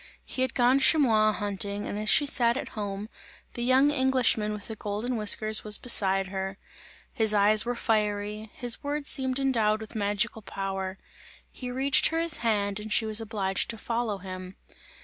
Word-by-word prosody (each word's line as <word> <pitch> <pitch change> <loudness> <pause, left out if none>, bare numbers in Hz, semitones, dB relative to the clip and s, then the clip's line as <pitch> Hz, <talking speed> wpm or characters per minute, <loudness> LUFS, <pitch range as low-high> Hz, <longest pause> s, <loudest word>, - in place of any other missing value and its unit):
He 255 - -4
had 260 - -1
gone 250 +1 +3
chamois 225 -8 +4
hunting 205 0 -2
and 205 - -4
as 215 0 -2
she 290 - +5
sat 240 -3 +2
at - - -5
home, 205 -1 -5 0.5
the 240 - -6
young 260 +4 +4
Englishman 260 -6 +2
with 210 -1 -7
the 220 - -7
golden 215 +4 -4
whiskers 215 0 +3
was 210 -1 -1
beside 195 -5 +2
her; 190 0 -5 0.6
his 220 -2 0
eyes 210 +2 +4
were 245 +1 -2
fiery, 210 -1 -2
his 245 +3 +1
words 290 0 -1
seemed 260 -1 +2
endowed 225 -6 +1
with 220 0 -10
magical 215 +1 -2
power; 195 -1 -5 0.5
he 250 - -7
reached 265 +2 +3
her 325 - -2
his 335 -2 +1
hand 205 -3 -1
and 215 0 -8
she 220 - +2
was 220 +1 0
obliged 205 -3 -2
to 230 - -2
follow 230 -2 -3
him. 185 0 -9
215 Hz, 175 wpm, -27 LUFS, 205-245 Hz, 0.6 s, she